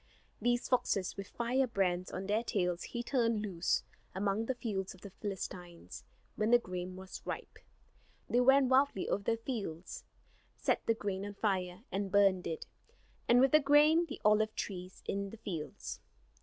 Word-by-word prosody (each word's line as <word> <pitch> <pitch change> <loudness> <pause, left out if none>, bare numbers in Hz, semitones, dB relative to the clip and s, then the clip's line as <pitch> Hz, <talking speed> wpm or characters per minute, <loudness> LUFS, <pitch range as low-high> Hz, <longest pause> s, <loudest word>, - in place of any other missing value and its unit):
These 240 0 +1
foxes 200 -7 +1
with 195 -1 -6
firebrands 230 -8 0
on 190 +1 -5
their 210 +3 +1
tails 180 -6 0
he 240 - -4
turned 230 -4 +1
loose 180 -4 0 0.3
among 200 +3 0
the 260 - 0
fields 195 -6 -3
of 185 - -19
the 200 - -9
Philistines 180 -4 -7 0.3
when 215 +1 +1
the 240 - +8
grain 180 -4 -5
was 190 0 -9
ripe. - - -6 0.7
They 245 - +2
ran 270 +1 +6
wildly 260 -5 +3
over 200 - -1
the 230 - +2
fields, 205 -9 -5 0.5
set - - +1
the 230 - +3
grain 200 -3 -3
on 205 0 -6
fire, 185 -2 -1
and 195 0 -2
burned 195 -2 +4
it; 160 - -4 0.6
and 240 +1 +6
with 265 +1 +5
the 305 - +7
grain 300 +4 +5
the 285 - -7
olive 215 +1 +4
trees 185 -1 -6
in 200 0 -2
the 225 - -10
fields. 175 -8 -6
205 Hz, 165 wpm, -33 LUFS, 185-240 Hz, 0.7 s, the